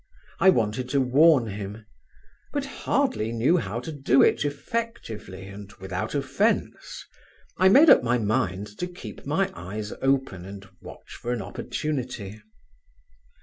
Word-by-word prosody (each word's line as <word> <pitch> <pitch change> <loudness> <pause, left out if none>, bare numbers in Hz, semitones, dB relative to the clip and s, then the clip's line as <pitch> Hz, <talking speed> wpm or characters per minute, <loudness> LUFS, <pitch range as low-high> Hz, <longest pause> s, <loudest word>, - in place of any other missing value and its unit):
I 190 - +6
wanted 120 - +1
to 140 - +2
warn 135 +1 +5
him; 105 +1 -7 0.7
but - - -1
hardly 110 +1 -1
knew 120 +10 +2
how 110 - -3
to 145 - -6
do 135 -3 +3
it - - +3
effectively 145 - -5
and 100 +1 -10
without 95 -1 -5
offence: - - -1 0.5
I 185 +1 +5
made 280 +8 +8
up - - +7
my 120 +1 +1
mind 100 -3 0
to 180 - -2
keep 130 - -10
my - - +1
eyes 105 +4 -6
open 135 -9 0
and 100 +1 -10
watch - - -12
an 120 -3 -2
opportunity. 115 -2 -4
115 Hz, 135 wpm, -25 LUFS, 100-140 Hz, 0.7 s, made